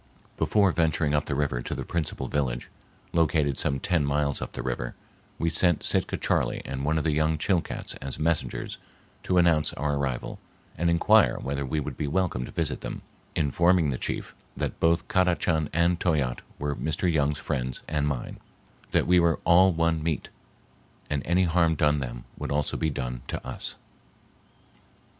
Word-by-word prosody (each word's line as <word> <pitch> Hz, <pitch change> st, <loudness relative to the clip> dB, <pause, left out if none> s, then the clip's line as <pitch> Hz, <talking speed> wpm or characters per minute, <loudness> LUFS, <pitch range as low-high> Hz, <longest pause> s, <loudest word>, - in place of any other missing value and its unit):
Before 100 Hz, -3 st, +3 dB
venturing 80 Hz, -3 st, +1 dB
up 75 Hz, 0 st, +2 dB
the 70 Hz, -, -1 dB
river 70 Hz, -4 st, 0 dB
to -, -, -4 dB
the -, -, -5 dB
principal 85 Hz, -3 st, -2 dB
village, 65 Hz, -4 st, -2 dB, 0.4 s
located 75 Hz, -4 st, +2 dB
some 70 Hz, +1 st, 0 dB
ten 85 Hz, 0 st, +1 dB
miles 70 Hz, 0 st, 0 dB
up -, -, -5 dB
the -, -, -4 dB
river, -, -, -3 dB, 0.4 s
we 85 Hz, -, -1 dB
sent 85 Hz, 0 st, +3 dB
Sitka -, -, +1 dB
Charley -, -, 0 dB
and 65 Hz, 0 st, -4 dB
one 75 Hz, +2 st, +1 dB
of 80 Hz, -, 0 dB
the 80 Hz, -, +1 dB
young 80 Hz, +1 st, +1 dB
Chilcats 85 Hz, +2 st, -1 dB
as 70 Hz, -1 st, -4 dB
messengers 80 Hz, 0 st, -1 dB, 0.4 s
to 90 Hz, -, 0 dB
announce 85 Hz, -3 st, +3 dB
our 75 Hz, +1 st, -1 dB
arrival 65 Hz, -3 st, -3 dB, 0.4 s
and 85 Hz, +1 st, +1 dB
inquire 85 Hz, 0 st, +4 dB
whether 70 Hz, +1 st, -3 dB
we 75 Hz, +4 st, -1 dB
would 75 Hz, -, -5 dB
be 75 Hz, -, -2 dB
welcome 80 Hz, -6 st, 0 dB
to -, -, -10 dB
visit -, -, -1 dB
them, -, -, -6 dB, 0.3 s
informing 85 Hz, +1 st, +3 dB
the 65 Hz, -, -3 dB
chief -, -, -3 dB, 0.2 s
that -, -, -3 dB
both 85 Hz, +2 st, +2 dB
Kadachan 85 Hz, -4 st, +2 dB
and 85 Hz, +1 st, +2 dB
Toyatte 70 Hz, -8 st, 0 dB, 0.2 s
were 75 Hz, 0 st, -2 dB
Mr. 80 Hz, +5 st, 0 dB
Young's 75 Hz, -1 st, +1 dB
friends 65 Hz, -5 st, -3 dB
and 75 Hz, -1 st, 0 dB
mine, 70 Hz, -4 st, -4 dB, 0.5 s
that -, -, +2 dB
we 90 Hz, 0 st, +5 dB
were 85 Hz, -1 st, +2 dB
"all 95 Hz, +3 st, +6 dB
one 80 Hz, -1 st, +1 dB
meat" 80 Hz, -1 st, -2 dB, 0.8 s
and 70 Hz, -1 st, 0 dB
any 90 Hz, +2 st, +3 dB
harm 85 Hz, -1 st, +3 dB
done 75 Hz, -1 st, +2 dB
them -, -, -6 dB
would -, -, -4 dB
also 75 Hz, 0 st, 0 dB
be 80 Hz, -, 0 dB
done 60 Hz, -3 st, -4 dB
to -, -, -5 dB
us. -, -, -2 dB
75 Hz, 175 wpm, -27 LUFS, 70-85 Hz, 0.8 s, all